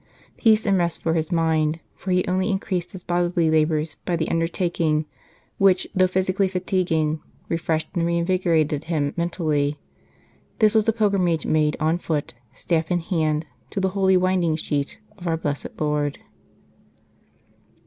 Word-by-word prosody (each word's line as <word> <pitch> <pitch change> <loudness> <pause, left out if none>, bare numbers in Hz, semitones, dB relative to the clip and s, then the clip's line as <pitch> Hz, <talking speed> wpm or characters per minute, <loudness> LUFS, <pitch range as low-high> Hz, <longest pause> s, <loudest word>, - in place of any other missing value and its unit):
Peace 220 -2 +3
and 195 -3 +3
rest 170 -2 -1
for 165 - +1
his 160 -1 -1
mind, 160 -1 +1 0.2
for 190 - -8
he 180 0 +2
only 185 +2 0
increased 190 -3 -2
his 185 -2 -9
bodily 175 -2 +1
labours 155 0 +1
by 175 - 0
the 165 -1 -1
undertaking, 165 -2 0 0.5
which, 195 -1 +4
though 185 0 +4
physic 185 +1 -1
ally 195 - +4
fatiguing, 175 -4 0 0.3
refreshed 160 -1 -1
and 170 - 0
reinvigorated 170 -4 +1
him 150 -4 -1
mentally. 155 -4 0 0.8
This 215 0 +4
was 220 0 +3
a - - +6
pilgrimage 195 -7 +1
made 150 -1 +2
on 160 +3 +1
foot, 155 -6 -2 0.2
staff 160 +4 -1
in 175 -1 +1
hand, 160 -3 0 0.2
to - - -3
the 190 0 +1
Holy 190 -1 +3
Winding 180 -3 +2
Sheet 145 -2 -2 0.2
of 175 - -6
Our 165 -1 +1
Blessed 145 -3 -4
Lord. 150 -2 0
170 Hz, 150 wpm, -23 LUFS, 155-185 Hz, 0.8 s, a